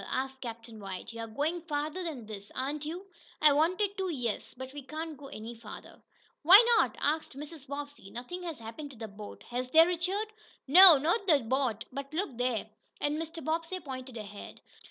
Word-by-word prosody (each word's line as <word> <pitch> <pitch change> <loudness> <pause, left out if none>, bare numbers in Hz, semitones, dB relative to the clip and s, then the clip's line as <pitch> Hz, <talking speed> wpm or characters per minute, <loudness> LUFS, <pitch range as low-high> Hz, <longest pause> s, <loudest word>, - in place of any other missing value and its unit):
asked 265 0 -3
Captain 230 -2 -8
White. 195 +2 -7
"You're 230 0 -5
going 300 +10 -2
farther 305 +2 -3
than 290 -9 -5
this; 205 -1 -9
aren't 285 +3 -2
you?" 350 +5 -6 0.3
"I 300 -1 +6
wanted 365 +7 +2
to, 380 -1 -1
yes. 245 -9 -3
But 260 +1 -8
we 290 - -7
can't 310 +4 -6
go 275 0 -11
any 225 -1 -7
farther." 225 -2 -11 0.4
"Why 365 +6 +10 0.2
not?" - - +1
asked 305 -2 -1
Mrs. 295 -1 -9
Bobbsey. 285 -6 -7
"Nothing 245 - -7
has 335 -4 -5
happened 230 +6 -8
to 265 - -13
the 220 0 -6
boat, 205 0 -10
has 250 +1 -2
there, 320 +4 +8
Richard?" 375 +5 -1 0.3
"No, 350 +2 +11
not 345 +9 0
to 310 -5 +6
the 275 - -6
boat. 235 -2 0
But 275 +3 -6
look 365 -7 -2
there!" 245 -3 -1 0.3
and 295 +2 -1
Mr. 325 0 -7
Bobbsey 330 +3 -1
pointed 260 -5 -7
ahead. 205 -1 -9
285 Hz, 190 wpm, -30 LUFS, 240-325 Hz, 0.4 s, No